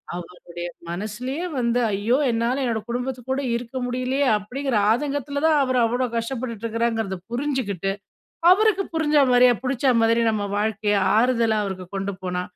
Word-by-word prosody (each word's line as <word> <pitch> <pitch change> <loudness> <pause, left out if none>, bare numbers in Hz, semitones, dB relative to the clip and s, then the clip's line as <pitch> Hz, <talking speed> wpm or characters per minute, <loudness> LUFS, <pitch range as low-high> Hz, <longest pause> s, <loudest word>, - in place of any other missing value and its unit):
அவருடைய 175 0 -8 0.2
மனசுலேயே 220 - -4
வந்து 235 0 +1
ஐயோ! 205 +5 +1 0.2
என்னால 235 +4 0
என்னோட 230 -3 0
குடும்பத்து 250 +1 -3
கூட 265 +1 0
இருக்க 235 +1 -6
முடியலயே! 255 +3 0
அப்பிடிங்கிற 250 +4 -2
ஆதங்கத்தில 285 +3 -1
தான் 310 -2 +4
அவரு 255 -1 +1
அவ்ளோ 245 +3 0
கஷ்டப்பட்டுட்டு 230 -1 -4
இருக்கிறாங்கிறத 225 -3 -1
புரிஞ்சுகிட்டு, 240 - -2 0.6
அவருக்கு 400 0 +4
புரிஞ்சா 300 -2 +3
மாரியே 245 0 +6
பிடிச்ச 265 +1 -1
மாதிரி 230 +1 +3
நம்ம 210 -2 -1
வாழ்க்கை 210 0 0 0.2
ஆறுதலா 230 -2 +2
அவருக்கு 185 -2 -5
கொண்டு 195 +1 -2
போனா 180 0 -2
235 Hz, 140 wpm, -23 LUFS, 215-265 Hz, 0.6 s, மாரியே